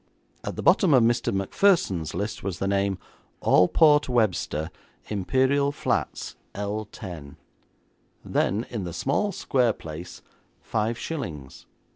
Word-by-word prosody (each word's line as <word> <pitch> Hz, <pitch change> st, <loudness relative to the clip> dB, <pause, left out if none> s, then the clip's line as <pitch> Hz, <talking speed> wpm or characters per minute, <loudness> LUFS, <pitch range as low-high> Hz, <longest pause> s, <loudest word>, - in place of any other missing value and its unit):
At -, -, -4 dB
the -, -, -5 dB
bottom 170 Hz, -9 st, +5 dB
of 125 Hz, -, +5 dB
Mr. 120 Hz, +1 st, +2 dB
Macpherson's 95 Hz, -, +1 dB
list 100 Hz, +4 st, -3 dB
was 95 Hz, -3 st, -3 dB
the 100 Hz, -, -2 dB
name 100 Hz, -1 st, +1 dB, 0.5 s
Alport 150 Hz, -, +5 dB
Webster, 95 Hz, -10 st, 0 dB, 0.4 s
Imperial 130 Hz, +8 st, +2 dB
Flats, 145 Hz, -, -2 dB, 0.2 s
£10; 100 Hz, -7 st, -6 dB, 0.9 s
then 105 Hz, +6 st, 0 dB
in 110 Hz, -5 st, -3 dB
the 85 Hz, -2 st, -5 dB
small, 170 Hz, -, 0 dB
square 125 Hz, -, +1 dB
place, 80 Hz, +1 st, -9 dB, 0.4 s
five 110 Hz, +1 st, -1 dB
shillings. 80 Hz, -, -6 dB
105 Hz, 115 wpm, -25 LUFS, 90-130 Hz, 0.9 s, bottom